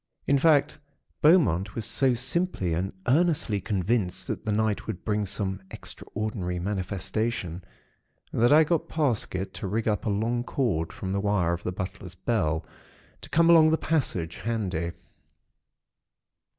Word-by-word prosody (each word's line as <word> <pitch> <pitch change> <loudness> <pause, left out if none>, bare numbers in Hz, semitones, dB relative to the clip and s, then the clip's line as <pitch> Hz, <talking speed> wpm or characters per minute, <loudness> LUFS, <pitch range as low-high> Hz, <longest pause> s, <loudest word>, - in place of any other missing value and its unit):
In 140 0 +3
fact, 150 -1 +3 0.4
Beaumont 115 - +4
was 115 - -2
so 130 +1 +2
simply 130 - 0
and 90 +4 -1 0.2
earnestly 145 - +2
convinced 100 -1 -1
that - - -4
the 110 - -1
night 110 0 0
would 90 - -5
bring 105 -1 0
some 95 -1 -3
extraordinary 105 -4 -4
manifestation, 95 0 -2 0.7
that 120 +3 +3
I 155 +2 +8
got 160 0 0
Parsket 110 - -1
to - - -5
rig 110 +4 -1
up 105 0 0
a - - +2
long 115 +4 0
cord 105 - -1
from 95 - -5
the 100 0 0
wire 100 -4 +1
of 85 - -4
the 90 - -3
butler's 95 0 -6
bell, 85 -6 0 0.6
to - - -10
come 165 +3 +4
along 160 -2 +7
the 160 - +3
passage 120 - -1
handy. 95 -8 -2
105 Hz, 145 wpm, -27 LUFS, 95-125 Hz, 0.7 s, I